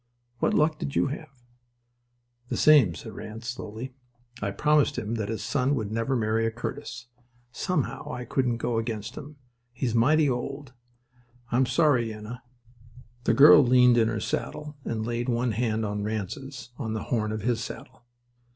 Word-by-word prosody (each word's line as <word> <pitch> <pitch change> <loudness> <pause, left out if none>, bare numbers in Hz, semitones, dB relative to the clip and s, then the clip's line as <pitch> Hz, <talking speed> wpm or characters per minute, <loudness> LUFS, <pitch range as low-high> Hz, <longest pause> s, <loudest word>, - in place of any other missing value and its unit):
What - - +1
luck 155 0 +2
did 140 - -4
you 140 - +2
have?" 155 +2 -6 1.2
"The - - -2
same," 140 - +6
said - - -9
Ranse, 110 +2 -8
slowly. 125 +1 -6 0.5
"I 100 - -1
promised 150 +7 +2
him 110 -2 -3
that 110 -3 -2
his 110 - -3
son 140 0 +1
would 110 -5 -3
never 115 +4 0
marry 115 -1 +1
a - - +2
Curtis. 125 +1 -6 0.5
Somehow 160 +2 -2
I 125 0 -5
couldn't 125 -1 0
go 115 0 -1
against 110 -2 -4
him. 150 0 -9 0.4
He's 120 -1 -2
mighty 145 +6 +4
old. 135 +1 -3 0.8
I'm 125 +2 +3
sorry, 140 -8 +3
Yenna." 110 +3 -8 0.8
The - - +3
girl 145 +1 +9
leaned 125 -1 +5
in 110 - +4
her 115 -1 -1
saddle 150 +7 -4
and 110 -1 -3
laid 120 +1 -2
one 120 0 +1
hand 110 0 0
on 105 0 -2
Ranse's, 120 +5 -5
on 110 -2 -3
the 110 - -3
horn 110 -3 -1
of 110 -2 -4
his 115 -1 0
saddle. 120 - -9
120 Hz, 165 wpm, -27 LUFS, 110-135 Hz, 1.2 s, girl